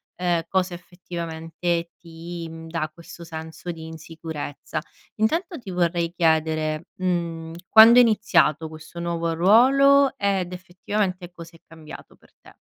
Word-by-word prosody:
ehm, 175 Hz, -2 st, 0 dB
cosa 185 Hz, -1 st, 0 dB
effettivamente 170 Hz, -1 st, -4 dB
ti, 170 Hz, 0 st, -8 dB
mhmm, 165 Hz, 0 st, -10 dB
dà 160 Hz, -2 st, -2 dB
questo 170 Hz, +1 st, -12 dB
senso 160 Hz, +1 st, -7 dB
di 160 Hz, -1 st, -9 dB
insicurezza. 160 Hz, -1 st, -6 dB, 0.4 s
Intanto 330 Hz, -, 0 dB
ti 200 Hz, -5 st, -9 dB
vorrei 170 Hz, -1 st, 0 dB
chiedere, 155 Hz, -1 st, +1 dB
mhmm, 170 Hz, -3 st, -2 dB, 0.2 s
quando 225 Hz, +2 st, +9 dB
è -, -, +10 dB
iniziato 165 Hz, -8 st, +2 dB
questo 155 Hz, +2 st, -11 dB
nuovo 170 Hz, -1 st, -2 dB
ruolo 270 Hz, +9 st, +5 dB
ed 190 Hz, -4 st, -1 dB
effettivamente 185 Hz, 0 st, -3 dB
cosa 170 Hz, -1 st, -12 dB
è 165 Hz, -, -17 dB
cambiato 160 Hz, -1 st, -12 dB
per -, -, -25 dB
te? -, -, -17 dB
170 Hz, 135 wpm, -23 LUFS, 165-185 Hz, 0.4 s, è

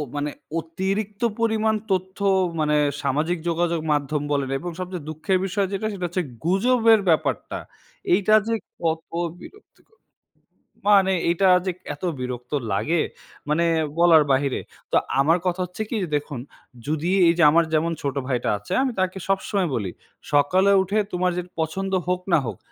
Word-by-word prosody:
মানে 145 Hz, 0 st, -1 dB, 0.3 s
অতিরিক্ত 195 Hz, +5 st, -3 dB, 0.2 s
পরিমাণ 220 Hz, -1 st, +2 dB, 0.2 s
তথ্য 190 Hz, 0 st, -1 dB, 0.4 s
মানে 150 Hz, -1 st, +2 dB, 0.3 s
সামাজিক 155 Hz, +6 st, 0 dB
যোগাযোগ 170 Hz, 0 st, 0 dB
মাধ্যম 145 Hz, 0 st, 0 dB
বলেন 140 Hz, -2 st, 0 dB
এবং 175 Hz, -, -5 dB
সবচেয়ে 180 Hz, -4 st, -5 dB
দুঃখের 155 Hz, +5 st, 0 dB
বিষয় 195 Hz, +1 st, 0 dB
যেটা 200 Hz, +2 st, -1 dB
সেটা 185 Hz, -3 st, -4 dB
হচ্ছে 180 Hz, +1 st, -2 dB, 0.2 s
গুজবের 225 Hz, +4 st, +4 dB
ব্যাপারটা। 160 Hz, -, 0 dB, 0.6 s
এইটা 210 Hz, -, +3 dB
যে 230 Hz, -, 0 dB, 0.3 s
কত 160 Hz, -1 st, -1 dB, 0.3 s
বিরক্তিকর। 425 Hz, +2 st, -17 dB, 0.9 s
মানে 195 Hz, -2 st, +5 dB, 0.2 s
এইটা 175 Hz, +3 st, +3 dB, 0.2 s
যে 185 Hz, -, +1 dB, 0.2 s
এত -, -, -21 dB, 0.2 s
বিরক্ত 125 Hz, -1 st, -5 dB, 0.2 s
লাগে, 150 Hz, +12 st, +1 dB, 0.5 s
মানে 160 Hz, +3 st, +2 dB, 0.3 s
বলার 165 Hz, -3 st, +7 dB
বাহিরে। 135 Hz, 0 st, +1 dB, 0.3 s
তো -, -, +4 dB, 0.2 s
আমার 160 Hz, +5 st, +4 dB
কথা 180 Hz, +1 st, -1 dB
হচ্ছে 180 Hz, +4 st, -8 dB
কি? -, -, -2 dB
যে, -, -, -2 dB
দেখুন 145 Hz, -3 st, -6 dB, 0.5 s
যদি 155 Hz, +3 st, -1 dB, 0.2 s
এইযে 170 Hz, 0 st, +3 dB
আমার 165 Hz, +2 st, +4 dB
যেমন 160 Hz, +2 st, +2 dB
ছোট 140 Hz, -2 st, -2 dB
ভাইটা 125 Hz, -3 st, -1 dB
আছে 105 Hz, -, -6 dB
আমি 265 Hz, -, 0 dB
তাকে 185 Hz, 0 st, 0 dB
সবসময় 195 Hz, -1 st, 0 dB
বলি। 100 Hz, -6 st, -2 dB, 0.4 s
সকালে 185 Hz, +7 st, +4 dB
উঠে 200 Hz, +3 st, -2 dB, 0.2 s
তোমার 180 Hz, 0 st, +1 dB
যে 180 Hz, -, -1 dB, 0.2 s
পছন্দ 190 Hz, +5 st, -2 dB, 0.2 s
হোক 180 Hz, 0 st, 0 dB
না 165 Hz, -, +6 dB
হোক -, -, -5 dB
175 Hz, 150 wpm, -23 LUFS, 150-195 Hz, 0.9 s, বলার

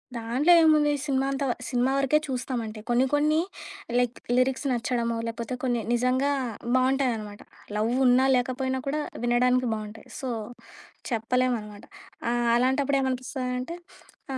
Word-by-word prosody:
దాంట్లో 240 Hz, +8 st, +1 dB
ఏముంది? 305 Hz, -2 st, +4 dB
సినిమా 270 Hz, -2 st, +1 dB
అంతా 275 Hz, 0 st, -1 dB, 0.2 s
సినిమా 250 Hz, +1 st, +1 dB
వరకే 275 Hz, +2 st, +3 dB
చూస్తామంటే 245 Hz, -4 st, -4 dB
కొన్ని 240 Hz, +2 st, +3 dB
కొన్ని 305 Hz, +2 st, +3 dB, 0.6 s
లైక్ 245 Hz, -1 st, 0 dB, 0.2 s
లిరిక్స్ 260 Hz, +2 st, +1 dB
నచ్చడమో, 235 Hz, -1 st, -1 dB
లేపోతే 230 Hz, +2 st, -4 dB
కొన్ని 245 Hz, -3 st, 0 dB
నిజంగా 255 Hz, +3 st, +2 dB, 0.4 s
బాగుంటాయనమాట 255 Hz, -6 st, 0 dB, 0.4 s
లవ్వున్నా 250 Hz, +4 st, +3 dB
లేకపోయినా 260 Hz, +1 st, -1 dB
కూడా 300 Hz, +2 st, 0 dB, 0.2 s
వినడానికి 250 Hz, +1 st, +2 dB
బావుంటాయి. 215 Hz, 0 st, -7 dB
సో 260 Hz, -, -4 dB, 0.8 s
చెప్పలేమనమాట 230 Hz, -2 st, -1 dB, 0.5 s
ఆహ్, 240 Hz, -1 st, +1 dB
అలాంటప్పుడు 270 Hz, +3 st, +2 dB
ఏమనిపిస్తదంటే 255 Hz, +3 st, -3 dB, 0.6 s
ఆ! -, -, -2 dB
255 Hz, 115 wpm, -26 LUFS, 240-265 Hz, 0.8 s, ఏముంది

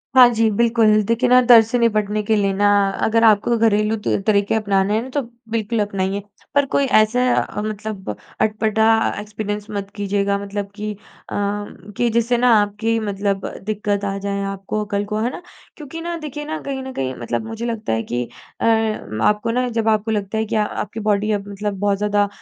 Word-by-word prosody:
हाँ 255 Hz, -1 st, +9 dB
जी, 225 Hz, 0 st, +2 dB
बिल्कुल 225 Hz, -1 st, +3 dB
देखिए 230 Hz, +3 st, +1 dB
ना 250 Hz, 0 st, +7 dB
दर्द 230 Hz, -2 st, +8 dB
से 230 Hz, +3 st, -1 dB
निपटने 215 Hz, -2 st, +1 dB
के 220 Hz, +1 st, +1 dB
लिए 200 Hz, -1 st, +1 dB
ना 205 Hz, +1 st, +2 dB, 0.4 s
अगर 230 Hz, +1 st, +2 dB
आपको 225 Hz, +2 st, +4 dB
घरेलू 215 Hz, -1 st, +2 dB
तुर 205 Hz, -2 st, -1 dB
तरीके 205 Hz, 0 st, +2 dB
अपनाने 200 Hz, -1 st, +1 dB
हैं 220 Hz, -, +1 dB
ना, 260 Hz, -, -8 dB
तो 285 Hz, +2 st, -1 dB, 0.3 s
बिल्कुल 225 Hz, 0 st, -1 dB
अपनाइए। 200 Hz, -1 st, -1 dB, 0.3 s
पर 285 Hz, -, +4 dB
कोई 275 Hz, +1 st, +1 dB
ऐसा 215 Hz, +3 st, +2 dB, 0.5 s
मतलब 215 Hz, -2 st, -5 dB, 0.3 s
अटपटा 220 Hz, 0 st, +1 dB, 0.4 s
एक्सपीरियंस 210 Hz, 0 st, -5 dB
मत 200 Hz, -1 st, -4 dB
कीजिएगा। 200 Hz, 0 st, 0 dB
मतलब 200 Hz, 0 st, -5 dB
कि 210 Hz, 0 st, -4 dB
अ, -, -, -14 dB, 0.4 s
कि 205 Hz, +2 st, -3 dB
जिससे 235 Hz, +1 st, +2 dB
ना 250 Hz, +1 st, +3 dB
आपकी 220 Hz, +3 st, -1 dB
मतलब 200 Hz, -2 st, -2 dB, 0.2 s
दिक्कत 205 Hz, -1 st, -1 dB
आ 195 Hz, 0 st, -2 dB
जाए 200 Hz, 0 st, -3 dB
आपको 195 Hz, +2 st, -3 dB
कल 200 Hz, 0 st, 0 dB
को। 210 Hz, +1 st, -3 dB
है 240 Hz, -, +1 dB
ना? -, -, -8 dB, 0.4 s
क्योंकि 310 Hz, +2 st, -8 dB
ना 340 Hz, +1 st, -3 dB
देखिए 295 Hz, -1 st, -6 dB
ना 315 Hz, +1 st, -3 dB
कहीं 270 Hz, -1 st, -4 dB
न 265 Hz, -, -6 dB
कहीं 130 Hz, -1 st, -2 dB
मतलब 120 Hz, -, -3 dB
मुझे 225 Hz, +1 st, -5 dB
लगता 225 Hz, -, -3 dB
है -, -, +1 dB
है -, -, -3 dB
कि 120 Hz, +1 st, -2 dB, 0.4 s
अ, -, -, +1 dB
आपको 215 Hz, -, +1 dB
ना 250 Hz, +1 st, 0 dB
जब 225 Hz, -1 st, -1 dB
आपको 220 Hz, 0 st, +1 dB
लगता 205 Hz, 0 st, -2 dB
है 220 Hz, -, 0 dB
कि 225 Hz, +1 st, -3 dB
आपकी 210 Hz, 0 st, -2 dB
बॉडी 210 Hz, 0 st, +1 dB
अब 200 Hz, -1 st, -2 dB
मतलब 205 Hz, 0 st, -4 dB
बहुत 200 Hz, 0 st, +1 dB
ज़्यादा 205 Hz, 0 st, +1 dB
215 Hz, 195 wpm, -20 LUFS, 200-230 Hz, 0.5 s, हाँ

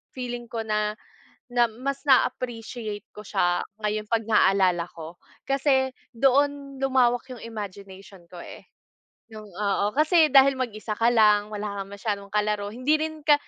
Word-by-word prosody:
feeling 245 Hz, -1 st, -5 dB
ko 230 Hz, -1 st, -3 dB
na, 210 Hz, 0 st, -1 dB, 0.6 s
na 245 Hz, 0 st, +3 dB
mas 265 Hz, +5 st, -5 dB
na 265 Hz, -2 st, +6 dB
appreciate 225 Hz, -3 st, -7 dB
ko 210 Hz, -, -8 dB
siya 175 Hz, -1 st, +1 dB, 0.2 s
ngayon 210 Hz, 0 st, -1 dB
pag 225 Hz, -1 st, +1 dB
naalala 190 Hz, -4 st, +3 dB
ko 165 Hz, +1 st, -9 dB, 0.3 s
kasi 270 Hz, -1 st, +2 dB, 0.2 s
doon 275 Hz, +2 st, +1 dB
lumawak 250 Hz, -2 st, +2 dB
yung 245 Hz, -, -10 dB
imagination 200 Hz, -4 st, -9 dB
ko, 180 Hz, -, -11 dB
eh, -, -, -12 dB, 0.7 s
yung, 215 Hz, -1 st, -10 dB
oo, 200 Hz, +1 st, 0 dB
kasi, 310 Hz, +1 st, +4 dB
dahil 275 Hz, 0 st, +7 dB
mag-isa 215 Hz, -3 st, -3 dB
ka 230 Hz, +1 st, +4 dB
lang 210 Hz, -3 st, +4 dB
wala 205 Hz, -1 st, -4 dB
kang 195 Hz, -, -13 dB
masyadong 200 Hz, -1 st, -4 dB
kalaro 210 Hz, -1 st, 0 dB
hindi 255 Hz, +5 st, +1 dB
rin 315 Hz, -1 st, -4 dB
ka 295 Hz, -, +7 dB
220 Hz, 150 wpm, -25 LUFS, 205-260 Hz, 0.7 s, dahil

